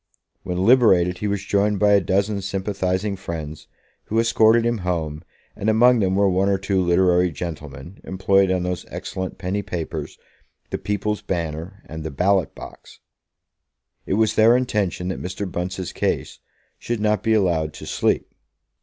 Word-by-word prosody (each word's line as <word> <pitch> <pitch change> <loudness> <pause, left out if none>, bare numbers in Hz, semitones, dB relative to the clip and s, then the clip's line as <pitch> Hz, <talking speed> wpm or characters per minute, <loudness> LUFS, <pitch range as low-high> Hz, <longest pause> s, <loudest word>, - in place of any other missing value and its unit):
When 90 - -4
liberated, 95 -8 +4
he 105 - -2
was 100 -1 -2
joined 100 +1 +1
by 105 0 +4
a 100 -1 +5
dozen 100 +3 0
sympathising 95 0 -2
friends, 80 -5 -7 0.4
who 110 - 0
escorted 115 0 +4
him 120 -1 0
home, 80 -4 -3 0.3
and 105 - -1
among 120 +2 +5
them 95 -2 +1
were 100 0 +3
one 95 +1 +2
or 100 - +2
two 95 0 0
literary 90 0 +3
gentlemen, 75 0 -8
employed 95 +1 +2
on 90 -1 0
those 90 -1 -3
excellent 95 0 -5
penny 95 +2 -2
papers, 85 -5 -5 0.5
the - - -2
People's 105 +1 -2
Banner 85 +2 -4
and 80 0 -7
the 80 - -4
Ballot 90 +3 +1
box. - - -12 1.1
It - - 0
was 110 0 +2
their 115 +3 +5
intention 100 -7 -1
that 95 - -4
Mr. 95 +3 -4
Bunce's 90 +1 -4
case - - -2 0.4
should 120 -1 -3
not 105 0 +1
be 110 0 +2
allowed 85 -6 +1
to - - -10
sleep. - - 0
95 Hz, 160 wpm, -22 LUFS, 90-105 Hz, 1.1 s, a